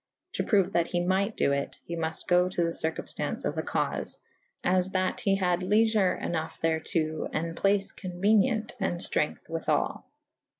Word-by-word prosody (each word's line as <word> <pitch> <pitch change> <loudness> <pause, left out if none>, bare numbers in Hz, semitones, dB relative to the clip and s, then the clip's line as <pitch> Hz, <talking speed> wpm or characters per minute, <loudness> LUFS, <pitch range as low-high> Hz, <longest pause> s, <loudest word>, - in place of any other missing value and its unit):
To - - -1
proue 195 -4 +3
that 170 -3 +2
he 175 - -1
might 190 +4 +1
do - - +2
it; 140 0 -2
ye 170 - -4
muft 160 -1 -3
go 180 0 +4
to 180 -2 0
the 165 - +1
circumftance 160 -1 -2
of - - 0
the - - 0
caufe - - -2 0.3
/ - - -44
as 185 0 +1
that 185 -1 0
he 195 -1 +2
had 180 -2 +1
lyefer^ 210 0 +3
ynough 160 -1 -3
thereto 160 -1 -1
and 165 +1 -2
place 200 +1 +2
con 185 -3 -7
uenient 215 +4 +2
and 175 -3 -1
ftrength 150 - -1
withall. 165 0 -1
180 Hz, 175 wpm, -28 LUFS, 165-195 Hz, 0.3 s, go